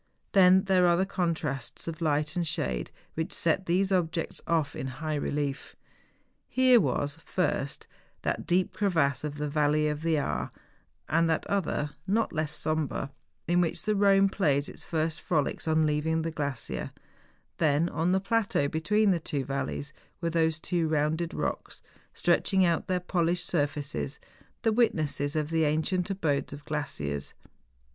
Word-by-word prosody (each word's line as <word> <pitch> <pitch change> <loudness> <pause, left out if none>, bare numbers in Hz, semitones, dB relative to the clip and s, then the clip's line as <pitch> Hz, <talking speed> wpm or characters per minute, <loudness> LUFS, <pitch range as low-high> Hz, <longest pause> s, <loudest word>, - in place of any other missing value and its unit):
Then 190 -1 +6
there 185 -2 +4
are 170 0 +4
the 190 - +2
contrasts 160 -10 -2
of 165 0 -5
light 155 0 0
and 175 -2 0
shade - - -1 0.2
which 160 0 -3
set 170 +4 0
these 190 +3 +2
objects 170 -3 -1
off 160 -4 +1
in 130 - -4
high 155 +4 -4
relief. 145 -1 -2 0.7
Here 255 -2 +5
was, 145 +1 -1
first, 145 -5 -1 0.4
that - - -2
deep 180 +1 +2
crevasse 170 -9 +1
of 150 -1 -3
the 150 0 -2
Valley 150 +1 +2
of 150 0 -2
the 165 -1 +1
Aar, 145 - -2 0.6
and 165 +1 +2
that 160 - 0
other, 160 -6 -1 0.2
not 220 +3 +1
less 155 -2 -1
sombre, 155 -3 -2 0.4
in 175 +1 +3
which 170 0 -1
the 215 +2 +1
Ehone 195 -1 +4
plays 145 -8 +2
his - - -9
first 160 0 -1
frolics 155 -1 -1
on 160 0 +3
leaving 155 +2 0
the 165 - -2
glacier; 135 - -3 0.7
then, 155 +1 +3
on 175 0 0
the 190 - +3
plateau 200 -7 +1
between 200 +8 +2
the 175 - +1
two 145 -4 -3
valleys, 140 +1 -3 0.3
were 170 -1 -1
those 160 -1 +1
two 170 0 0
rounded 160 +2 0
rocks, - - -4 0.3
stretching 190 -2 +2
out 170 -1 +1
their 185 -1 +1
polished 175 -1 0
sur¬ 145 -4 +2
faces, 145 -1 -4 0.4
the 225 - +3
witnesses 155 -10 +1
of 155 0 -1
the 165 -1 +2
ancient 160 +5 0
abodes 155 -8 -1
of 145 0 -10
glaciers. 75 - -3
160 Hz, 160 wpm, -28 LUFS, 145-180 Hz, 0.7 s, Then